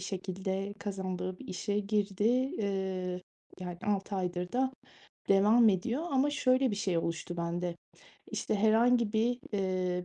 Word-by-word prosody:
şekilde 190 +1 -3
kazandığı 185 -2 -4
bir - - -11
işe 205 +3 -1
girdi. 205 -1 -1 0.4
Eee, 190 -3 -2 0.4
yani, 175 -1 -5
6 200 -1 0
aydır 180 -1 -2
da 260 +1 +1 0.6
devam 210 +4 +6
ediyor 215 - 0
ama 275 +1 +3
şöyle 260 -2 +3
bir 205 - -2
şey 190 -4 0
oluştu 170 +1 -3
bende: 170 0 -2 0.5
İşte, - - -1
herhangi 225 +2 +4
bir, 235 +3 +2
eee, 185 -2 0
195 Hz, 130 wpm, -31 LUFS, 180-220 Hz, 0.6 s, devam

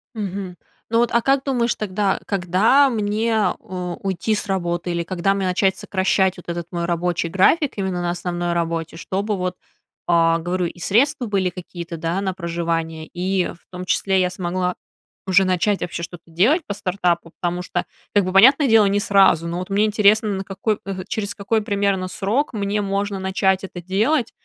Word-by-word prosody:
Мгм. 195 -3 -5 0.3
Ну 230 +1 +2
вот, 240 -1 +2
а 235 - +3
как 270 +1 +2
думаешь 245 -4 0
тогда, 200 -1 -1
когда 200 +9 +3
мне, 220 0 -1 0.3
э, 180 -1 -5
уйти 195 +3 -1
с - - -3
работы 175 -2 -1
или 170 0 -1
когда 185 +2 0
мне 195 -1 -2
начать 190 +1 +2
сокращать 190 -1 +1
вот 175 - -13
этот 170 -1 -4
мой 170 -1 -2
рабочий 175 0 -1
график, 260 - +3
именно 190 -3 -2
на 175 0 -1
основной 175 0 -2
работе. 165 -1 -2
Чтобы 200 +5 -2
вот, 180 0 -2 0.5
а, 165 -1 +4
говорю, 175 +2 -1
и 175 - -10
средства 245 - +2
были 195 -4 0
какие-то, 175 -2 -8
да, 170 +4 -2
на 190 -2 -1
проживание 165 -2 -3
и, 185 +1 0
в 170 - -10
том 180 0 -7
числе, 190 0 +1
я 180 - +1
смогла 180 0 -2 0.5
уже 190 +1 +5
начать 185 +2 +1
вообще 170 -1 -4
что-то 170 0 -8
делать 230 - +3
по 205 - -3
стартапу, 175 -4 -1
потому 175 0 -1
что, - - -3 0.3
как 205 - +5
бы 185 - -2
понятное 270 +8 +6
дело, 220 -2 +6
не 200 +1 +1
сразу, 195 -5 +4
но, 170 +1 -3
вот 185 - -6
мне 200 +2 +2
интересно, 215 +1 +3
на 195 -1 -2
какой 200 +2 -2
э, 190 -1 -4
через 205 -2 -3
какой 215 +2 0
примерно 200 -2 0
срок 205 +10 -1
мне 205 -1 -1
можно 200 0 -2
начать 190 0 +1
это 180 -2 -8
делать, 220 - +1
190 Hz, 185 wpm, -21 LUFS, 175-205 Hz, 0.5 s, понятное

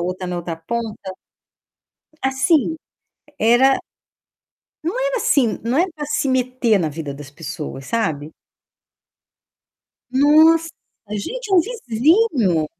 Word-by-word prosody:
outra 185 +1 -3
na 180 0 -3
outra 170 -1 -4
ponta. 210 +2 -5 1.1
Assim, 270 +4 +2 0.6
era 240 +5 +4 1.1
Não 345 +10 -2
era - - 0
assim 265 - +2
não 240 +4 -1
é 355 - +3
pra 300 -2 -5
se 295 -1 -1
meter 255 -4 +1
na 165 -4 0
vida 150 -1 -6
das 140 0 -10
pessoas, 150 -3 -7
sabe. 160 -9 -2 1.8
Nossa! 315 +4 +5 0.4
Gente, 415 - -5
é - - +6
um 360 - +7
vizinho! 285 - +1
240 Hz, 115 wpm, -20 LUFS, -, 1.8 s, um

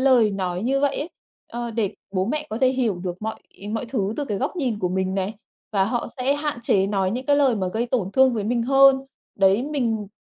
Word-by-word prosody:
lời 255 -5 +5
nói 185 -1 -2
như 270 +3 +1
vậy 285 -1 +1
ấy, 320 +5 -4 0.4
ờ, 240 0 -3
để 220 -4 -1 0.2
bố 185 -1 +1
mẹ 300 +6 -2
có 220 - -3
thể 260 - +5
hiểu 255 -5 +1
được 180 +3 -5
mọi 220 0 -2 0.4
mọi 225 +3 -2
thứ 210 -5 -1
từ 295 - -1
cái 205 -6 -3
góc 280 +8 -2
nhìn 250 -9 -1
của 180 - 0
mình 190 +1 -1
này, 195 +2 -2 0.4
và 195 -2 +3
họ 235 +3 -2
sẽ 265 +3 +1
hạn 290 -3 -2
chế 195 -3 +2
nói 195 -2 0
những 250 +4 -4
cái 285 -1 +4
lời 270 -5 +4
mà 190 -3 -1
gây 225 +5 -1
tổn 225 -6 -1
thương 265 -2 +4
với 210 - -2
mình 235 +2 0
hơn. 270 +1 +6 0.4
Đấy, 195 +4 +4
mình 235 -8 -1
230 Hz, 240 wpm, -23 LUFS, 195-265 Hz, 0.4 s, hơn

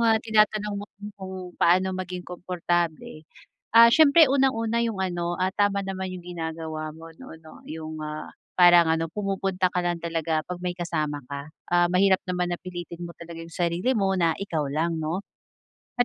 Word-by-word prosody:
ah, 225 -1 +4
tinatanong 215 -1 +2
mo 205 - -6
ko - - -78 0.2
kung 190 0 -6 0.3
paano 185 +2 +4
maging 180 -1 -5
komportable, 175 -3 -3 0.5
ah, 230 0 +10
siyempre 315 +2 +7
unang-una 235 -4 +2
'yong 230 -4 -1
ano, 175 -1 -2
ah, 185 +1 0
tama 205 0 +1
naman 190 -1 -4
'yong 175 - -11
ginagawa 160 -1 -4
mo, 165 0 -11
'no, 160 - -11
'no, 160 -1 -14
'yong, 155 0 -6
ah, 155 0 -6 0.3
parang 175 -1 +8
ano 165 0 0
pumupunta 195 0 -1
ka 180 - +1
lang 175 -1 -1
talaga 160 -2 -1
pag 180 -1 -6
may 180 -1 -3
kasama 155 -5 -3
ka. 140 +1 -6 0.2
Ah, 175 0 +4
mahirap 190 +1 +3
naman 180 -1 -1
na 175 - -4
pilitin 175 -1 -8
mo 170 - -9
talaga 170 0 -9
'yong 165 - -11
sarili 175 +9 0
mo 195 -2 +2
na 170 -3 +2
ikaw 160 -7 -2
lang, 160 +2 -1
'no. 165 +6 -3 0.7
At 245 - +3
175 Hz, 180 wpm, -25 LUFS, 165-195 Hz, 0.7 s, ah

